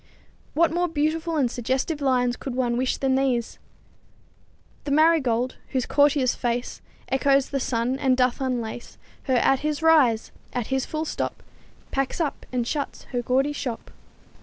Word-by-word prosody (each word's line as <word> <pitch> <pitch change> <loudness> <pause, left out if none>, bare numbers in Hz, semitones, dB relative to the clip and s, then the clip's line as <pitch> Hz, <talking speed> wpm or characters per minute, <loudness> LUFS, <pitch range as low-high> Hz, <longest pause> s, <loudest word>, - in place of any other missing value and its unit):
What 335 +1 +4
more 355 +1 +1
beautiful 320 +1 -1
and 255 -5 +2
suggestive 260 +6 -2
lines 250 -3 +2
could 260 -1 -6
one 245 -2 0
wish 255 +1 0
than 265 -1 +1
these: 260 -3 0 1.3
"The - - -3
marigold, 280 -5 +3 0.2
whose 255 -2 +1
courtier's 285 -3 +3
face 240 0 -3 0.3
Echoes 275 0 +2
the 275 - -1
sun, 250 +1 -1
and 265 -3 +2
doth 250 +1 +1
unlace 240 -3 -4 0.3
Her 260 - +1
at 265 +2 +3
his 300 +1 -2
rise, 280 -9 +4 0.2
at 245 -3 -2
his 265 -1 0
full 315 0 -3
stop - - -4 0.5
Packs 275 +3 -1
up 310 -4 -2
and 245 -2 -1
shuts 285 +3 -3
her 245 -2 -1
gaudy 265 +4 +1
shop." 245 -5 -5
265 Hz, 155 wpm, -24 LUFS, 245-290 Hz, 1.3 s, What